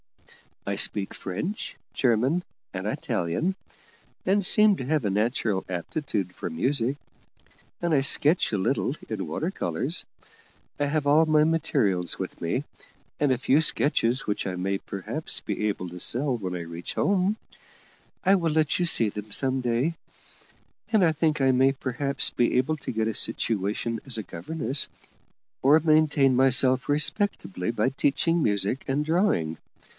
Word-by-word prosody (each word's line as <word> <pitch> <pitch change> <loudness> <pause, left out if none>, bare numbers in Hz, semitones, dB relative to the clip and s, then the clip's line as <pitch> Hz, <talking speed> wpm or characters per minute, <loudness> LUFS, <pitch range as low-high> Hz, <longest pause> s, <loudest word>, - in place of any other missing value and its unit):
I - - -2
speak 100 -2 +1
French, 110 - -5 0.2
German, 130 +8 +1 0.3
and - - -5
Italian, 120 - -2 0.7
and 200 +2 +2
seem 210 +2 +6
to 130 - -5
have 150 -3 0
a 100 - 0
natural 105 -1 0
aptitude 95 - -3
for - - -5
music; 125 - 0 0.8
and 170 -2 0
I 140 - +4
sketch 150 +5 +3
a 105 - 0
little 95 - 0
in - - -4
water - - -2
colours. - - -2 0.7
I 145 - +1
have 145 +1 -1
all 150 +3 +5
my 155 -1 +4
materials 135 - 0
with - - -6
me, - - -1 0.6
and 145 -2 +2
a 130 - +2
few 135 +3 +3
sketches 130 -5 +2
which 105 - -2
I 90 - -3
may 95 +2 -1
perhaps 100 -2 -2
be 105 - -3
able 90 -3 -3
to 90 +1 -9
sell 130 +7 +1
when 95 -4 -4
I 90 - -4
reach 85 +1 -7
home 200 +2 +1 0.9
I 195 +1 +5
will 170 -4 0
let 155 +1 +1
you 175 - +2
see 115 -10 +5
them 105 +1 -8
some 130 +3 +1
day 125 +7 0 1.0
and 215 -4 +4
I 165 - +4
think 155 -1 0
I 135 0 +4
may 130 +1 +4
perhaps 135 +1 +1
be 120 +1 +1
able 135 +5 +1
to - - -6
get 110 -1 -1
a 115 - -1
situation 110 +1 -2
as 130 -4 -4
governess, 135 - -2 0.7
or 145 +4 +5
maintain 155 -4 +3
myself 130 0 +3
respectably 145 - 0
by 120 - 0
teaching 145 +5 +1
music 105 +2 0
and 140 +2 0
drawing. 155 - +1
135 Hz, 155 wpm, -26 LUFS, 105-155 Hz, 1.0 s, seem